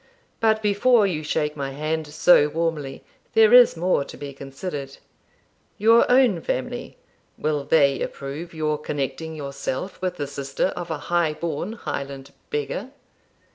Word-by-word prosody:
But 220 -1 +2
before 210 +2 +4
you 170 -6 -1
shake 150 -1 -1
my 140 -2 -3
hand 155 +2 -2
so 150 0 +5
warmly, 150 -3 -3 0.3
there 225 +1 +6
is 245 -8 +8
more 175 -3 +1
to - - -11
be 140 -1 -7
considered. 135 +1 -7 0.8
Your 230 +3 +5
own 245 -9 +4
family 130 - -4 0.4
will 150 -1 -1
they 140 -4 +3
approve 145 +5 -5
your 155 -2 -1
connecting 150 +2 -4
yourself 140 +4 -5
with 180 -1 -2
the 145 - -2
sister 140 +4 -2
of 175 -1 -6
a 160 - -2 0.2
high 170 -3 +3
born 170 +5 -3
Highland 140 -10 -6 0.2
beggar?' 445 +3 -3
155 Hz, 140 wpm, -23 LUFS, 140-185 Hz, 0.8 s, is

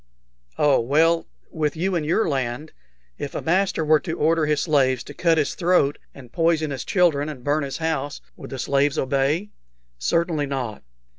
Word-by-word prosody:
"Oh, 145 -2 +4
well, 160 +7 +2 0.2
with 150 -2 -1
you 190 +3 0
in 170 -3 0
your 170 +8 +1
land, 135 +1 -2 0.5
if 140 - -5
a - - -2
master 180 -1 +1
were 155 0 +5
to 165 -1 -5
order 160 0 +2
his 150 -2 +1
slaves 130 -5 +2
to 145 - -10
cut 165 +1 +2
his 150 - +1
throat 170 -5 +2 0.2
and 125 -4 -13
poison 165 -2 +1
his 135 -2 -4
children 155 -6 +2
and 135 -5 -8
burn 145 +3 +1
his 140 -2 -4
house, 155 -3 -2 0.2
would - - -10
the 135 - -6
slaves 140 +2 +1
obey?" 140 +9 0 0.5
"Certainly 155 - 0
not." 130 -6 -4
150 Hz, 175 wpm, -23 LUFS, 140-165 Hz, 0.5 s, were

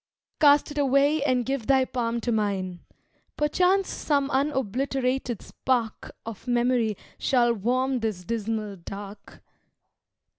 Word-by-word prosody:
"Cast 290 -1 +5
it 295 - -3
away, 280 +2 +3
and 255 -4 +1
give 270 -4 -2
thy 265 -1 +4
palm 235 -2 -2
to 240 - -1
mine: 195 -5 -1 0.6
Perchance 365 +6 +2
some 280 -2 0
unobliterated 265 -2 -1
spark 240 -4 -2
Of 225 +1 -8
memory 240 -3 +1 0.2
shall 240 -2 +3
warm 255 +4 0
this 215 -5 -3
dismal 215 -1 -3
Dark. 200 +3 -10
250 Hz, 115 wpm, -26 LUFS, 220-275 Hz, 0.6 s, Cast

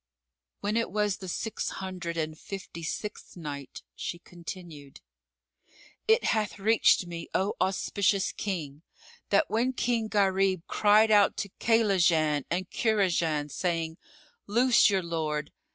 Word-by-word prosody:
When 210 +2 0
it 230 - 0
was 210 0 0
the 190 - -8
Six 215 +4 -3
Hundred 180 -3 -5
and 155 -1 -2
Fifty 185 0 -8
sixth 205 +4 -6
Night, 145 -4 -7
She 175 - -4
continued, 170 -4 -10 1.1
It 445 +2 +4
hath 215 -3 0
reached 210 -2 +4
me, 170 -1 -7
O 195 +2 +1
auspicious 195 +1 +1
King, 155 -8 -4 0.5
that 315 - +3
when 245 +4 0
King 235 -3 0
Gharib 195 -3 +1
cried 215 +1 +4
out 205 -1 +5
to 200 - -3
Kaylajan 175 - +3
and 180 +1 -1
Kurajan, 170 -9 +1
saying, 165 0 -2 0.5
"Loose 240 +3 +5
your 195 -2 +1
lord!" 155 -3 -2
190 Hz, 125 wpm, -28 LUFS, 165-210 Hz, 1.1 s, out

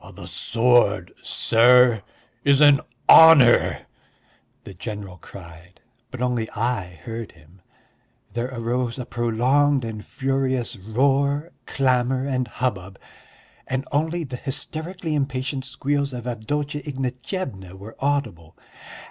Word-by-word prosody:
"The - - -10
sword, 115 -5 +1
sir, 120 -1 +4 0.4
is 140 -1 +4
an 145 -2 +6 0.3
honour," 150 -7 +7 0.8
the 100 - -10
general 100 -1 -7
cried, 85 0 -14 0.3
but 130 -1 -5
only 120 -3 -1
I 100 -8 -3
heard 115 +1 -7
him. 80 +4 -22 0.7
There 120 +1 -2
arose 120 0 -2
a 125 - -5
prolonged 125 +4 +1
and 110 -2 -6
furious 130 -2 -2
roar, 140 - 0 0.2
clamour, 130 -1 0
and 130 -3 -1
hubbub, 100 -6 -4 0.7
and 130 +1 -3
only 160 +4 -1
the 130 -4 -7
hysterically 160 +6 -4
impatient 135 -1 -2
squeals 140 +1 -2
of 120 -1 -7
Avdotya 145 +5 -3
Ignatyevna 130 - -5
were 105 +4 -11
audible. 135 - -2
125 Hz, 110 wpm, -23 LUFS, 110-140 Hz, 0.8 s, honour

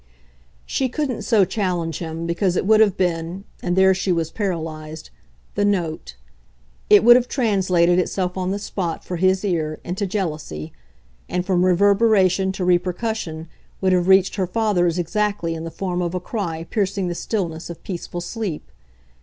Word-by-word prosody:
She 260 - -1
couldn't 265 -4 -2
so 210 -2 +3
challenge 175 -5 -2
him, 165 0 -5
because 175 +2 0
it - - 0
would 215 +1 +5
have 205 -3 +4
been 175 +1 -1 0.2
and 175 -1 -1
there 190 0 +5
she 190 0 -1
was 165 -2 0
paralysed 160 -5 -4 0.4
the 205 - 0
NOTE. 165 - -1 0.7
It 210 - +7
would 240 +1 +9
have 250 0 +2
translated 185 -8 +2
itself 180 0 -1
on 185 -1 -2
the 195 - -1
spot, 185 -4 -4
for 180 - -4
his 190 +3 +2
ear, 155 -5 -1
into 190 +3 -3
jealousy; 155 - -4 0.6
and, 180 0 -1
from 180 -2 +2
reverberation 195 0 +3
to 185 -1 -3
repercussion, 180 -2 -1 0.3
would 190 -1 +2
have 180 0 +2
reached 190 +1 +4
her 190 -2 0
father's 180 -4 +1
exactly 200 -1 -1
in 165 0 -5
the - - -4
form 180 +1 -3
of 175 0 -2
a - - 0
cry 175 -5 -4
piercing 195 -2 0
the 175 - -2
stillness 170 -4 -3
of 170 - -9
peaceful 175 -1 -5
sleep. 190 -3 -5
185 Hz, 165 wpm, -21 LUFS, 170-200 Hz, 0.7 s, would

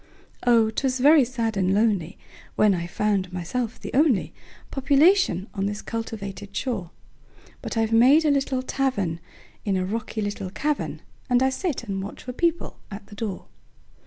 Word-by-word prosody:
Oh! 225 -2 +5
'twas 260 +2 -1
very 290 +2 +7
sad 230 -3 -2
and 190 -1 +1
lonelyWhen 205 0 0
I 170 -1 -3
found 195 0 0
myself 215 +7 -3
the - - -7
onlyPopulation 280 - +2
on 195 -1 -1
this 205 +1 -4
cultivated 205 -3 -6
shore; 220 -10 -3 0.7
But - - -5
I've 225 0 +1
made 265 +8 +6
a 300 - +4
little 270 -2 0
tavernIn 205 -12 -1 0.5
a 190 -2 +1
rocky 220 +1 -3
little 205 -2 -4
cavern, 295 +9 -2 0.3
And 250 +1 +4
I 265 - +3
sit 300 -2 -2
and 195 -4 -3
watch 200 - -8
for 250 - -6
people 340 +4 -1
at 200 -1 -8
the 205 - -13
door. 205 -3 -4
225 Hz, 150 wpm, -24 LUFS, 200-265 Hz, 0.7 s, very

